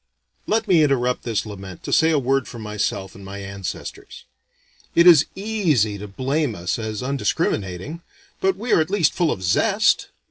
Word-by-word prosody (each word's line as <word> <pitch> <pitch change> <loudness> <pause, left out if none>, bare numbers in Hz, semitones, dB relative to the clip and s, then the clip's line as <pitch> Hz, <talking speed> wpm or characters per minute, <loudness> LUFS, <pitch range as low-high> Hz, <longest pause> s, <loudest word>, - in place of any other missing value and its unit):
Let 220 +1 +1
me 175 -5 +5
interrupt 125 -4 +1
this 115 -3 -2
lament 95 -4 -9
to - - -3
say 160 - +5
a 160 - +3
word 135 0 +1
for 120 - -9
myself 105 -3 -3
and 100 - -13
my 95 +1 -8
ancestors. 100 -2 -7 0.7
It 170 - +6
is 165 -5 +8
easy 165 - 0
to 105 - -7
blame 135 +4 -1
us 90 +5 -2
as 110 0 -4
undiscriminating, 125 - -2 0.4
but 190 0 +1
we 235 +4 -1
are - - +5
at 155 - -2
least 185 -6 +2
full 170 -3 +1
of 95 - -4
zest. 85 - +2
125 Hz, 175 wpm, -22 LUFS, 100-160 Hz, 0.7 s, is